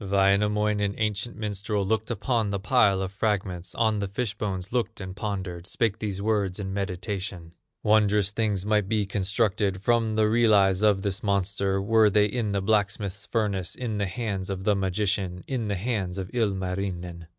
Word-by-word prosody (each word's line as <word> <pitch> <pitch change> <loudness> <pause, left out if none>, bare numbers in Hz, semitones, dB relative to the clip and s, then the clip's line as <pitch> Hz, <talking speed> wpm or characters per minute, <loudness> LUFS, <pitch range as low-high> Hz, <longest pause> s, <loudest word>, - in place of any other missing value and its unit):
Wainamoinen, 100 +1 +2
ancient 105 +1 -2
minstrel, 105 -1 -2
Looked 110 +2 0
upon 115 -1 0
the 100 - -1
pile 95 0 +3
of 95 - -4
fragments, 100 -4 -2
On 110 -2 +2
the 100 - -1
fish 105 +2 -2
bones 100 -1 -4
looked 120 -3 -1
and 95 -1 -6
pondered, 95 -4 -4
Spake 110 0 0
these 100 -3 -3
words 100 -3 0
in 95 -1 -4
meditation: 95 -2 -4 0.3
"Wondrous 105 -2 +3
things 105 -3 0
might 105 -2 +1
be 110 -2 +1
constructed 100 0 0
From 115 +1 +1
the 110 -1 +3
relics 105 -4 +4
of 105 -2 +3
this 100 0 -2
monster, 100 -1 0
Were 110 +2 +4
they 105 +1 +4
in 105 0 -1
the 100 -1 0
blacksmith's 100 -1 0
furnace, 100 -6 -1
In 110 -4 -3
the 100 - 0
hands 100 -2 -3
of 95 -1 -4
the 105 - +3
magician, 95 -1 -1
In 125 -5 -2
the 100 - -1
hands 100 -3 -2
of 95 -2 -5
Ilmarinen." 95 -5 -2
100 Hz, 170 wpm, -26 LUFS, 95-110 Hz, 0.3 s, relics